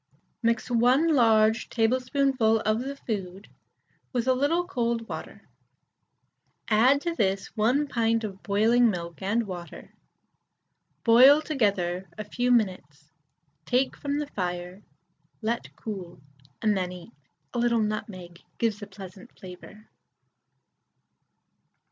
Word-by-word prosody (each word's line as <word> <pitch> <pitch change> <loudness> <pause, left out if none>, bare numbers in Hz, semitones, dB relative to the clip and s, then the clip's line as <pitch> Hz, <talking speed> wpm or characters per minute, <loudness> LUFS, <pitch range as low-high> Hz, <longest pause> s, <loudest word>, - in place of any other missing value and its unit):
Mix 230 +1 0
1 250 +7 +3
large 220 -3 +3
tablespoonful 250 -1 +1
of 215 +1 +1
the 275 +3 -5
food 195 -6 -6 0.6
with 245 -1 -2
a 260 - +5
little 295 +7 +1
cold 235 -8 -2
water, - - -8 1.2
add 250 +6 +4
to 340 +1 -2
this 195 -8 -1
1 245 +7 +2
pint 230 -2 0
of 195 -3 -6
boiling 225 +4 +3
milk 170 -3 -5
and 215 +4 0
water, 175 -3 -9 1.1
boil 255 +5 +7
together 195 - -1
a 215 - -4
few 245 +4 -2
minutes, 160 -10 -1 0.5
take 255 +2 0
from 285 -1 -3
the 295 - -2
fire, 180 -5 -5 0.6
let 230 +2 -3
cool, 190 -7 -7 0.4
and 215 -2 +3
then 180 -2 -2
eat. 180 -1 -11 0.4
A 240 - -2
little 235 -2 +2
nutmeg 185 -5 -5 0.2
gives 220 -2 -1
a 205 - -7
pleasant 190 +2 -12
flavour. 190 +3 -12
225 Hz, 120 wpm, -26 LUFS, 195-245 Hz, 1.2 s, boil